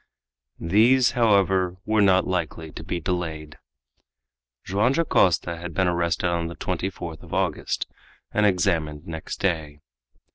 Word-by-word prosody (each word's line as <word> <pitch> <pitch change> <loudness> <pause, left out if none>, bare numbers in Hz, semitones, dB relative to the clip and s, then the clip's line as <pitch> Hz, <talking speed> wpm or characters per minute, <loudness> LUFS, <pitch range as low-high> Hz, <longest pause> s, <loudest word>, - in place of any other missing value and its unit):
These, 115 +9 +4
however, 95 -6 +2
were 110 0 +2
not 95 -2 +4
likely 80 -3 -3
to - - -8
be 90 - -3
delayed. 80 -3 -4 1.0
Joam 105 +7 +1
Dacosta 90 - +2
had 85 0 -7
been 95 -1 +2
arrested 85 -1 0
on 85 -1 -1
the 85 - -7
24th 90 -3 -4
of - - -7
August, - - -1 0.5
and 105 - +1
examined 85 -6 +1
next 80 -1 -6
day. 80 -6 -1
90 Hz, 130 wpm, -24 LUFS, 85-100 Hz, 1.0 s, These